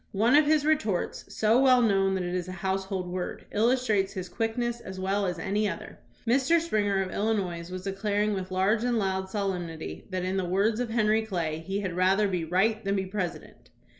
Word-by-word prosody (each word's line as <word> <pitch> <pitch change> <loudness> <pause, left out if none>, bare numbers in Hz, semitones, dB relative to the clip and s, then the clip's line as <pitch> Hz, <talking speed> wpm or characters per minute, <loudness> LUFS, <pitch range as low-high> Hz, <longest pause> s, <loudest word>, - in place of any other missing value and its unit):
One 225 +7 +4
of 300 0 +5
his 300 -1 +3
retorts, 225 - 0
so 220 +3 +3
well 255 -2 +6
known 195 -4 +3
that 185 - -1
it 175 0 -3
is 180 -1 -2
a 185 - -6
household 190 -1 -2
word, 180 0 -5
illustrates 220 -3 +2
his 185 -3 -5
quickness 235 +1 -2
as 190 -4 -8
well 195 +1 0
as 180 -1 -2
any 205 +5 0
other. 215 +1 -8 0.3
Mr. 265 +7 +3
Springer, 205 -11 +1
of 185 - -6
lUinois, 190 -6 -1
was 185 0 -6
declaring 205 +2 0
with 190 -1 -4
large 195 +4 +1
and 245 -1 +1
loud 190 -2 -1
solemnity 175 - -4
that, 185 -1 -2
in 185 +1 -1
the 190 - 0
words 200 +5 +1
of 245 -2 -1
Henry 220 -1 +2
Clay, 170 -7 -2
"he 195 +5 -3
had 185 -3 -3
rather 190 +4 +3
be 180 -3 -1
right 205 +7 +1
than 195 0 0
be 190 -1 -1
Presi 180 -5 -3
dent." - - -19
195 Hz, 205 wpm, -28 LUFS, 185-220 Hz, 0.3 s, well